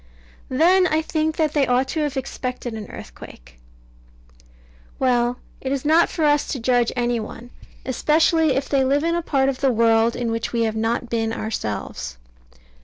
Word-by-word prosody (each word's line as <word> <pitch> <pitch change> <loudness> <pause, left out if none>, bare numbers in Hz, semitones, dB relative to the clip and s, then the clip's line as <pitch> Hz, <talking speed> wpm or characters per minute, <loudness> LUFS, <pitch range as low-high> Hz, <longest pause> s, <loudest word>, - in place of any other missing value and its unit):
Then 360 +8 +4
I 315 -1 +1
think 315 0 -1
that 310 -2 +1
they 285 -3 +2
ought 250 +2 +2
to 320 - -2
have 295 -2 -1
expected 250 -2 -4
an 215 -2 -7
earthquake. - - -12 1.4
Well 245 -1 +1 0.2
it 265 - -3
is 275 0 -2
not 320 +3 +4
for 315 - -1
us 295 0 +3
to 270 - -3
judge 240 0 +2
any 240 -1 0
one, 235 +2 -9 0.3
especially 310 +2 +2
if 270 +1 -1
they 275 -2 +2
live 280 +3 +1
in 335 0 +1
a 345 - 0
part 270 -5 +1
of 270 -2 -1
the 270 -2 +3
world 230 0 +3
in 240 -2 -2
which 230 0 -3
we 230 -1 +1
have 220 -1 -1
not 230 +2 -1
been 225 -1 0
ourselves. 105 - -4
255 Hz, 180 wpm, -22 LUFS, 230-295 Hz, 1.4 s, Then